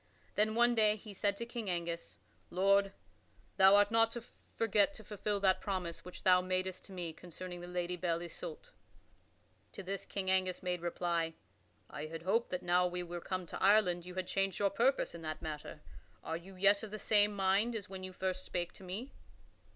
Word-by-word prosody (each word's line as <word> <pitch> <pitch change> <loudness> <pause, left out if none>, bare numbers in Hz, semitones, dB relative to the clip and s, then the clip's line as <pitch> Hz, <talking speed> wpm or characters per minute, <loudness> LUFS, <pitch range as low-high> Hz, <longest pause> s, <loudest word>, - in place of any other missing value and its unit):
Then 215 +1 +2
one 240 +1 +5
day 215 -2 +4
he 210 0 -10
said 200 +1 0
to 235 - -3
King 235 -3 -5
Angus: 170 -1 -3 0.3
"Lord, 195 +2 +3 0.7
thou 190 +1 +8
art 205 +1 +5
not 225 0 +5
to 240 - -5 0.3
forget 225 +5 +3
to 220 - -10
fulfil 205 0 -2
that 190 -1 +3
promise 185 -4 -3
which 180 - -10
thou 180 -1 +6
madst 185 0 -2
to - - -12
me 175 -3 -4
concerning 175 +1 -8
the 175 - -7
Lady 180 0 -2
Belle 170 -1 -1
Isoult." 485 - -8 1.0
To 195 - -7
this 195 +1 -4
King 190 -2 -1
Angus 185 -1 +1
made 180 -2 -1
reply: 170 -1 -1 0.5
"I 150 - -6
had 165 +1 -7
hoped 225 +6 +1
that 180 0 -3
now 180 0 +3
we 180 0 -3
were 175 0 -6
come 185 0 -3
to - - -7
Ireland 185 -4 +4
you 180 - -8
had 185 -1 -2
changed 195 +1 0
your 200 -1 +2
purpose 250 +7 +2
in 170 - -8
that 155 -1 -4
matter. 150 -2 -6 0.4
Are 160 - -3
you 185 +3 -9
yet 200 +2 +4
of 220 - -6
the 215 - -5
same 210 -1 +3
mind 200 +4 +2
as 210 -3 -4
when 190 0 -8
you 185 - -5
first 185 0 -2
spake 175 -1 -3
to - - -14
me?" 200 +9 -5
190 Hz, 200 wpm, -34 LUFS, 175-205 Hz, 1.0 s, thou